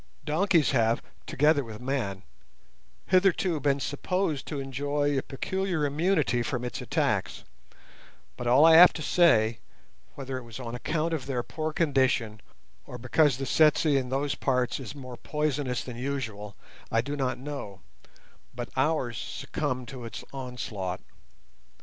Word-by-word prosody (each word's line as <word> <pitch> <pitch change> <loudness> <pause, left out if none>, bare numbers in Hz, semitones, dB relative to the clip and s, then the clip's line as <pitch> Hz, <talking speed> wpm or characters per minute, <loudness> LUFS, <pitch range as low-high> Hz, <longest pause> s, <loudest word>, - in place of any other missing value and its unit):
Donkeys 170 0 +2
have, 115 -3 +2 0.2
together 150 +1 +3
with 110 -3 -9
men, 120 -7 -3 0.8
hitherto 185 -3 +2
been 140 0 +1
supposed 155 +1 -2
to 145 - -4
enjoy 145 +2 -1
a 135 - +1
peculiar 175 +4 -2
immunity 150 -4 +1
from 125 0 -3
its 120 -5 -5
attacks; - - -1 0.9
but 120 - -5
all 130 +6 +6
I 165 0 +8
have 180 +2 +9
to 155 - -5
say, 115 -11 +4 0.6
whether 135 -1 -5
it - - -11
was 115 +1 -9
on 120 -2 -6
account 160 +6 -1
of 140 -5 -3
their 125 -3 -1
poor 155 +4 -4
condition, 130 - +1 0.5
or 125 - -7
because 130 +2 +2
the 135 - -3
tsetse 155 +4 +4
in 130 -2 0
those 135 +1 0
parts 130 -3 0
is 135 +1 -8
more 130 -3 -9
poisonous 145 -4 -2
than 125 -2 -8
usual, 115 -6 -4 0.4
I 115 - +3
do 140 +4 -4
not 135 -3 -1
know, 130 -9 -7 0.7
but 120 0 -5
ours 130 -4 0
succumbed 130 -6 -4
to 125 -3 -8
its 115 - -7
onslaught. 120 -8 -5
135 Hz, 145 wpm, -28 LUFS, 120-150 Hz, 0.9 s, have